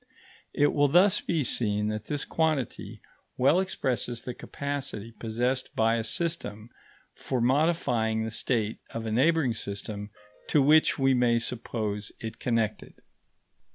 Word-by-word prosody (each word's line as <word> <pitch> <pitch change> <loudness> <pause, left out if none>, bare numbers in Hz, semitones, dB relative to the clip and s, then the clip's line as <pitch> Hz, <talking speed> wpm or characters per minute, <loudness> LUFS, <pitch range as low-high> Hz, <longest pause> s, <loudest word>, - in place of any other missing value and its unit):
It 145 0 +3
will 145 0 +4
thus 180 +7 +5
be 165 -4 0
seen 105 -4 0
that 110 0 -4
this 145 +2 -3
quantity 155 -6 -1 0.4
well 140 +7 +4
expresses 125 - -2
the 125 - -5
capacity 140 -6 -5
possessed 120 +4 -2
by 115 +1 +3
a 115 - -1
system 115 -6 -3 0.4
for 130 - -3
modifying 125 -5 +1
the 110 - -3
state 110 -1 -1 0.2
of 115 0 -3
a 110 - -2
neighbouring 135 +2 +3
system 105 0 -5 0.4
to 150 - +4
which 150 +3 +5
we 135 -1 +3
may 120 -2 +3
suppose 110 -3 -3
it 110 0 -7
connected. 115 -3 -2
120 Hz, 135 wpm, -28 LUFS, 110-145 Hz, 0.4 s, thus